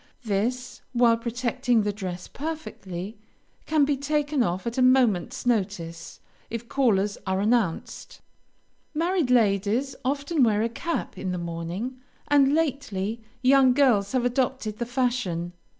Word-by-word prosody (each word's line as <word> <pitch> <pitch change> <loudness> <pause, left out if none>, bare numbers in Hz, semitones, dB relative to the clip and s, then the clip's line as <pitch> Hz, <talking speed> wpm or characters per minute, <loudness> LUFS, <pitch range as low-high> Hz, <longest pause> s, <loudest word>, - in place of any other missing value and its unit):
This, 245 +4 -2
while 240 -1 +5
protecting 240 0 0
the 205 0 -1
dress 185 -3 -6
perfectly, 215 - -6 0.5
can 310 -2 +3
be 290 0 +1
taken 290 0 0
off 185 -2 -1
at 235 +2 -2
a - - +3
moment's 250 -9 +3
notice 185 -8 -2 0.3
if 230 +1 -5
callers 210 -7 +1
are 190 0 +1
announced. 210 -4 -1 0.8
Married 335 -2 +1
ladies 225 +2 +2
often 285 +3 0
wear 215 -2 +3
a 230 - 0
cap 335 +8 -4
in 185 - -3
the 180 - -2
morning, 170 +9 -4 0.3
and 285 -1 +5
lately, 235 -9 -1 0.2
young 260 0 +6
girls 245 -7 +3
have 250 -2 +1
adopted 245 -3 -1
the 240 - -2
fashion. 240 -9 -1
240 Hz, 135 wpm, -26 LUFS, 200-265 Hz, 0.8 s, young